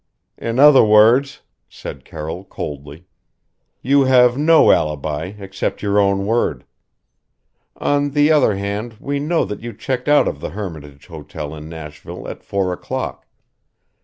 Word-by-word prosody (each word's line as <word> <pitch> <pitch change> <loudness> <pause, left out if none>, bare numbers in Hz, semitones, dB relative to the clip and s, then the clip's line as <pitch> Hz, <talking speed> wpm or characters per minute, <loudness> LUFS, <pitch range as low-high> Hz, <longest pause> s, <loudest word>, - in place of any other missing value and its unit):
"In 115 +1 -3
other 145 0 +7
words," 110 +6 +4 0.3
said 70 -2 -9
Carroll 80 +4 -7
coldly, 75 -2 -8 0.8
"You 140 +2 +3
have 125 -2 +5
no 155 +4 +5
alibi 75 +4 -1
except 95 0 -5
your 100 0 +2
own 100 -1 +1
word. 105 - -1 1.1
On 145 0 0
the 145 +2 +3
other 145 -9 +3
hand 100 +4 -4
we 140 +2 -3
know 160 +4 0
that 105 +1 -7
you 120 0 -7
checked 130 -1 -4
out 145 0 +4
of 70 - -3
the - - -5
Hermitage 75 -7 -8
Hotel 75 -2 -8
in 75 0 -9
Nashville 75 -2 -9
at - - -8
four 95 -2 -1
o'clock. - - -6
100 Hz, 140 wpm, -19 LUFS, 80-130 Hz, 1.1 s, other